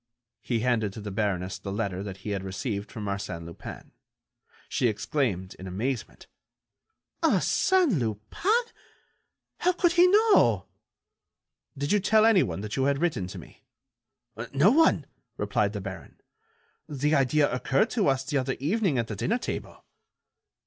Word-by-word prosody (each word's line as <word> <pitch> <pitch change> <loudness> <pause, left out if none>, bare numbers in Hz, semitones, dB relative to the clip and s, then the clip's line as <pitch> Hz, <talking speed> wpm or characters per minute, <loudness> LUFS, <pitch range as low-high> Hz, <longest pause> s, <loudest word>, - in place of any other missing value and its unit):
He 115 -3 -1
handed 110 -5 +1
to - - -8
the 105 -1 -6
baroness 95 -3 -2
the 100 - -6
letter 100 -2 -2
that 100 -2 -6
he 105 - -2
had 100 -2 -2
received 100 +2 -4
from 105 -2 -6
Arsène 100 -4 -4
Lupin. 85 0 -10 0.8
She 125 - +1
exclaimed, 105 - -1
in 95 - -7
amazement: 110 +6 -4 1.0
"Arsène 355 - +3
Lupin! 110 - -3 1.1
How 360 +1 +2
could 345 -1 +2
he 350 +1 +6
know?" 425 +3 +4 1.1
"Did 145 +1 -2
you 210 - +4
tell 215 +3 +4
anyone 180 - +3
that 105 0 -5
you 135 - +1
had 140 0 +2
written 140 - -1
to - - -8
me?" - - -13 0.9
"No 145 +9 +4
one," 320 +5 +4 0.3
replied - - 0
the - - -4
baron. - - -9 0.7
"The 150 +1 0
idea 145 +1 +3
occurred 135 - +1
to 215 -6 +1
us 135 -1 +2
the 145 +1 0
other 130 0 -1
evening 175 - +1
at 115 - +1
the 110 - -6
dinner 225 - 0
table." - - -6
130 Hz, 150 wpm, -27 LUFS, -, 1.1 s, he